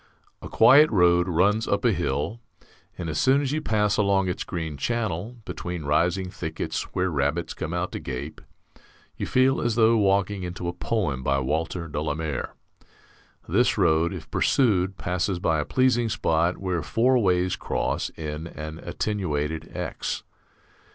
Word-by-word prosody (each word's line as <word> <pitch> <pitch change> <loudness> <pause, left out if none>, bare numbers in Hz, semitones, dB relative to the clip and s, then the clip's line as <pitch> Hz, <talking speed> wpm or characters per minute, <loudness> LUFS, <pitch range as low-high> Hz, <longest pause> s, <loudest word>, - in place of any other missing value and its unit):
A - - -8
quiet 145 +7 +7
road 90 -3 +4
runs 100 +6 +2
up - - 0
a 120 - +5
hill, 85 - -2 0.6
and 85 - -4
as 75 -1 -2
soon 135 +2 +4
as 140 -2 -1
you 155 +1 -1
pass 105 -6 +1
along 100 -2 +2
its 90 - -3
green 80 -4 -4
channel, 110 - -2
between 90 -2 -5
rising 90 +5 +1
thickets - - -4
where 90 0 +1
rabbits 75 +3 -1
come 80 - -5
out 90 +1 -2
to - - -5
gape, 65 -2 -6 0.7
you - - -4
feel 130 +1 +3
as 120 -2 0
though 115 0 +5
walking 100 -1 +1
into 90 0 -5
a 85 - -2
poem 90 - -1
by 70 +1 +1
Walter 80 +5 -2
de 75 -1 -3
la 75 -1 -1
Mare. 80 -3 -4 0.9
This - - +2
road, 80 +2 +3
if 90 -5 -8
pursued, 95 -7 +2
passes 90 +1 -1
by 80 -3 +1
a 75 - -1
pleasing 125 -3 +2
spot 85 -3 +1
where 90 -3 -2
four 120 - +2
ways 90 -3 +2
cross - - -2
in 75 +1 -5
an 80 -1 -7
attenuated 80 -9 -3
X. - - -4
90 Hz, 160 wpm, -25 LUFS, 80-105 Hz, 0.9 s, quiet